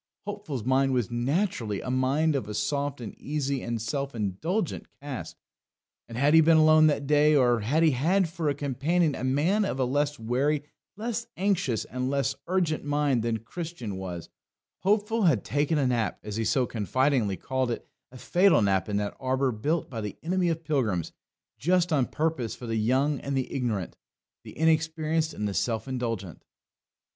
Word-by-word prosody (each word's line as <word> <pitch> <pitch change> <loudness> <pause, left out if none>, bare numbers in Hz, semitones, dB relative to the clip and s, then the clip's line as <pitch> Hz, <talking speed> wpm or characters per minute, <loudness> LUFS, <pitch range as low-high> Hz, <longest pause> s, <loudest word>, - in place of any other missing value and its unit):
Hopeful's 200 - -5
mind 130 +2 +2
was 120 -3 0
naturally 120 - -1
a 125 - -4
mind 140 +5 +2
of 105 -7 -2
a 105 - -4
soft 140 +6 -1
and 110 - -6
easy 140 -2 -2
and 115 -1 -3
self 135 +4 -3
indulgent 150 - -2
cast; 140 -2 -6 0.7
and 115 - -7
had 140 +4 +3
he 160 - +8
been 160 0 +5
alone 155 0 +6
that 145 -2 0
day, 150 +1 +4
or 120 -4 +4
had 140 +10 +1
he 160 - +5
had 170 +9 +2
for 165 -2 -2
a 140 - 0
companion 145 +4 0
a 130 - -5
man 155 +11 +2
of 135 -9 -2
a 130 - +2
less 145 +3 0
wary, 135 +6 0 0.3
less 230 +1 -3
anxious, 180 - 0
and 125 +1 -3
less 140 0 0
urgent 175 -4 0
mind 145 -3 +1
than 115 0 0
Christian 155 - -6
was, 90 -3 -6 0.5
Hopeful 210 +2 +1
had 140 - +3
taken 145 +3 0
a 140 - +2
nap, 120 -3 0
as 105 -1 -5
he 115 0 -1
so 130 +2 +2
confidingly 120 -2 0
called 130 -1 -1
it 120 - -4 0.2
a 130 - -11
fatal 180 - +4
nap 95 -1 +1
in 100 - 0
that 105 0 -2
arbour 130 0 +1
built 145 +10 -1
by 115 -4 -5
the 105 -2 -5
enemy 180 +1 +1
of 165 0 -2
pilgrims, 120 - 0 0.5
just 175 +2 +2
on 135 -5 +2
purpose 155 -7 -2
for 125 - -9
the 115 -1 -2
young 130 +6 +1
and 140 -1 -3
the 130 - -2
ignorant, 115 -9 -2 0.5
the - - -12
inexperienced 160 0 +1
and 105 - -2
the 100 - -3
self 115 +4 -1
indulgent. 115 -9 -4
140 Hz, 180 wpm, -27 LUFS, 120-160 Hz, 0.7 s, he